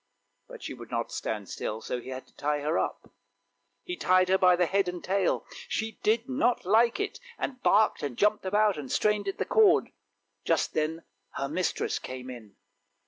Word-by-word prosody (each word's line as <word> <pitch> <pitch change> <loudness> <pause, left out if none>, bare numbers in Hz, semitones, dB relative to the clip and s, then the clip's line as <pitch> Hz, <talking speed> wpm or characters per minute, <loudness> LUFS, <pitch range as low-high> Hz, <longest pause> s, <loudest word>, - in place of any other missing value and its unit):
" - - -49
But - - -11
she - - -5
would - - -11
not - - -2
stand - - -4
still, 110 - -4
so 125 +2 -4
he 130 - -10
had 130 0 -6
to - - -28
tie 145 0 -1
her 155 +3 0
up. - - -4 0.7
He 360 - -4
tied 185 - +3
her 190 - +5
by 180 -1 +6
the 180 0 +2
head 195 +2 +1
and 180 -1 -5
tail; 190 0 0 0.2
she 220 0 -3
did 225 +2 +1
not 255 -5 +1
like 230 - +4
it, 415 +3 -3 0.2
and 255 -2 -4
barked 215 +2 +3
and 140 -5 -4
jumped 210 +1 +2
about 205 -1 +2
and 135 -3 -7
strained 210 -1 +1
at 195 - -2
the - - -1
cord; 430 -4 +4 0.5
just - - +1
then 160 +1 -1 0.3
her 140 - -2
mistress 170 +5 -1
came 130 0 -7
in. 110 -5 -11
185 Hz, 195 wpm, -28 LUFS, 150-215 Hz, 0.7 s, by